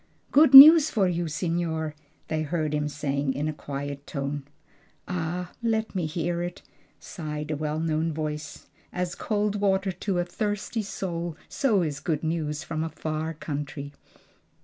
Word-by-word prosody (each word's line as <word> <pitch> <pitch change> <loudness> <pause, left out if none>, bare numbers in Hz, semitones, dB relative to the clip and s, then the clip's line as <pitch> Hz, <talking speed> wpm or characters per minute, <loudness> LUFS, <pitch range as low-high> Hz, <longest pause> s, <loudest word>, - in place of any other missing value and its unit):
"Good 285 -1 +6
news 310 +3 +12
for 200 -5 +2
you, 175 -1 -1
signor!" 160 0 -2 0.3
they 155 -1 -1
heard 155 -1 -2
him 150 0 0
say 145 -1 -3
in 145 +1 -1
a 155 - -2
quiet 140 -1 -6
tone. 140 -1 -4 0.6
"Ah! 180 0 -3
let 220 -1 -1
me 180 -5 -1
hear 170 +2 -2
it," 175 +1 -6 0.4
sighed 150 -3 -6
a - - 0
well 150 +1 -2
known 160 0 0
voice. 150 -1 -5 0.3
"'As 180 -1 -3
cold 210 +2 -1
water 190 -1 +1
to 185 +1 -3
a 175 - 0
thirsty 205 +4 -3
soul, 175 -5 -4
so 220 -10 +1
is 145 -3 -3
good 155 +1 -2
news 155 -2 -2
from 160 -1 -3
a 165 - -3
far 155 +1 -4
country.'" 145 -1 -6
160 Hz, 155 wpm, -26 LUFS, 150-180 Hz, 0.6 s, news